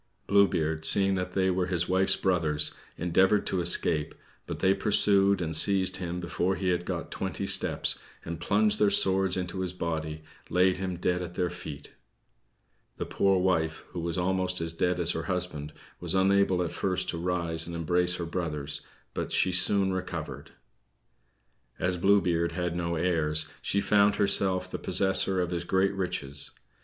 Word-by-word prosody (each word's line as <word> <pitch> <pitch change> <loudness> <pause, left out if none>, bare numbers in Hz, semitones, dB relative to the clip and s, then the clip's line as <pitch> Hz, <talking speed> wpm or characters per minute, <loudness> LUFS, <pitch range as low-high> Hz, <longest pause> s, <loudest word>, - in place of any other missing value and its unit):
Blue 100 0 +4
Beard, 80 -2 -2
seeing 100 +2 +4
they 95 0 0
were 90 0 -1
his 90 -3 0
wife's 95 +1 +2
brothers, 80 -5 +1 0.2
endeavored 95 +4 +2
to 95 - -1
escape, 85 -3 +1 0.3
but - - -5
they 95 0 +3
pursued 100 -1 +4
and 80 -1 -3
seized 95 +2 +3
him 90 -1 -4
before 90 +2 -1
he 95 +1 -2
had 90 -1 -1
got - - -5
twenty - - -4
steps, - - +3 0.3
and, 85 0 -6
plunging 105 +4 +1
their 105 - +4
swords 95 -1 +3
into 90 0 -4
his 90 -1 -3
body, 80 -3 -4 0.3
laid 90 +1 +2
him 90 -1 -4
dead 90 +1 -1
at 90 0 -7
their 90 -1 -1
feet. 80 -5 -9 1.1
The - - -4
poor 95 -1 +1
wife, 80 -4 0
who 90 - -6
was 85 0 -3
almost 95 0 0
as 80 0 -4
dead 90 +2 -1
as 85 0 +2
her 80 -1 -4
husband, 90 -5 -3 0.3
was 90 +1 -1
unable 95 -1 +2
at 85 - -4
first 95 -2 -1
to 85 - -3
rise 85 -2 -2
and 85 - -6
embrace 90 +2 0
her 85 - -4
brothers, 80 -4 -3 0.3
but - - -4
she 95 - +2
soon 95 +1 +2
recovered. 95 - -6 1.3
As 90 +1 -1
Blue 100 +3 +3
Beard 85 -1 -1
had 90 -1 -3
no 85 -1 -2
heirs, 80 -2 0 0.2
she 100 - -1
found 100 0 +3
herself 100 -2 +1
the - - -6
possessor 95 -1 +2
of 90 -1 -1
his 85 -1 -3
great 95 +2 +1
riches. 70 -7 -3
90 Hz, 170 wpm, -27 LUFS, 85-95 Hz, 1.3 s, Blue